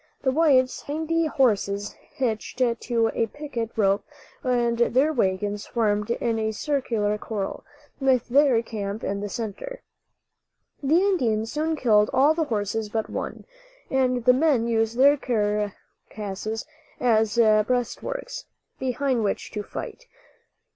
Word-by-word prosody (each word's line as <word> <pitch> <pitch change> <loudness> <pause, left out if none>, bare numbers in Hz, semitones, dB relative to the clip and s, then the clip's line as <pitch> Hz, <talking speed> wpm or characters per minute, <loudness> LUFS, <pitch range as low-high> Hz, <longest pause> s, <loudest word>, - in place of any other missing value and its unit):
The 260 - +3
whites 265 -4 +3
had 290 - -5
ninety 325 +1 0
horses 205 -7 +1 0.2
hitched 230 -5 -2
to 235 -2 +1
a 230 - 0
picket 255 -4 -5
rope 200 -2 +2 0.4
and 240 -2 +1
their 260 +6 +3
wagons 205 -3 -1
formed 210 -3 0
in 235 -1 0
a 220 0 -1
circular 220 -6 -1
corral, 205 -3 -4 0.4
with 260 -3 +2
their 260 -3 +4
camp 210 -1 -5
in 200 +1 -2
the 205 0 -4
center. 235 - -6 1.0
The 295 +4 +3
Indians 240 - +1
soon 315 +2 -1
killed 215 -7 +3
all 280 +4 +5
the 320 0 0
horses 215 -2 -2
but 220 0 -3
one, - - -5 0.5
and 255 -2 +1
the 250 - +7
men 265 -4 +2
used 225 0 0
their 285 +3 +6
carcasses 210 -2 -3 0.3
as 220 -3 +2
breastworks, 235 - +1 0.3
behind 260 -2 0
which 200 - -2
to 210 - -3
fight. 485 - -7
235 Hz, 130 wpm, -25 LUFS, 215-270 Hz, 1.0 s, the